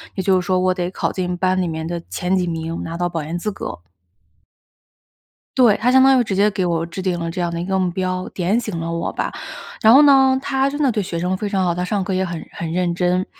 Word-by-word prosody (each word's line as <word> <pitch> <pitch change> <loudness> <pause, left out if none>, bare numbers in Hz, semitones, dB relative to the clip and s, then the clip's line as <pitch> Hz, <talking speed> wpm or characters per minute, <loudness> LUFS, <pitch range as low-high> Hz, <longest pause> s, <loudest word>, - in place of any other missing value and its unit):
也 190 - -2
就 185 -1 +3
是 175 - -9
说 185 -1 +1
我 185 0 +2
得 180 -1 -2
考 - - -2
进 180 -1 -3
班 185 0 +1
里 175 - -1
面 160 0 -4
的 170 -1 -4
前 185 0 -1
几 180 -1 0
名， 165 0 -4
拿 165 0 -5
到 175 0 0
保 165 -3 -4
研 165 +3 -4
资 210 +4 -3
格。 190 - -6 1.8
对， 235 -5 +5
她 245 +3 +1
相 260 0 +6
当 265 -1 +6
于 - - +4
直 195 -3 -2
接 205 +2 +4
给 190 -3 -2
我 165 -1 0
制 180 +3 -6
定 180 -2 -1
了 165 0 -3
这 180 - -5
样 175 - 0
的 170 0 -4
一 - - -3
个 190 0 0
目 180 -1 +1
标， 185 0 -2
点 190 +5 0
醒 210 -7 -5
了 165 0 -3
我 170 - -2
吧。 - - -3 0.5
然 220 +1 +7
后 280 +3 +8
呢， 265 -2 +5
她 270 0 0
真 290 +1 -5
的 270 -5 +3
对 210 - -1
学 170 -2 -4
生 180 +2 -1
非 205 +2 -3
常 190 -2 0
好， 175 -1 +1
她 180 +1 -2
上 195 0 -1
课 190 -1 -2
也 190 +1 +1
很 170 -2 -5
很 165 -1 -5
认 175 0 0
真。 180 +1 0
185 Hz, 290 characters per minute, -20 LUFS, 170-205 Hz, 1.8 s, 后